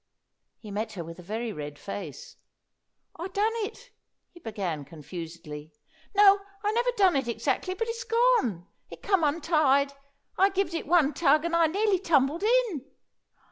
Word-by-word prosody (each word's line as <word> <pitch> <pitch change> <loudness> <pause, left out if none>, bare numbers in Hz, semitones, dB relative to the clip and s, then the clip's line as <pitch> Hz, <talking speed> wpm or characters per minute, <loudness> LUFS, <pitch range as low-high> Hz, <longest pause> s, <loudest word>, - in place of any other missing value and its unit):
He 210 - -11
met 215 +2 -3
her 180 -4 -5
with 165 +2 -10
a - - -8
very 220 +5 -4
red 145 -2 -7
face. 185 -6 -7 0.8
"I 340 +3 -4
done 410 +4 +1
it," 455 +3 -6 0.4
he 345 - -15
began 195 - -4
confusedly. 155 0 -9 0.4
"No, 400 0 +7 0.2
I 415 - +2
never 480 +3 +1
done 380 -5 +4
it 270 -3 0
exactly, 260 +10 -1
but 455 +3 -2
it's 460 +1 -4
gone. 460 - +2 0.2
It - - -12
come 385 -5 +2
untied. 290 -3 +2 0.5
I 390 +1 +6
gived 390 -2 -1
it 330 - -3
one 310 -4 +4
tug, 305 0 +3
and 340 0 0
I 335 -1 +5
nearly 395 +3 +1
tumbled 315 -3 +2
in." 445 - +2
305 Hz, 160 wpm, -27 LUFS, -, 0.8 s, No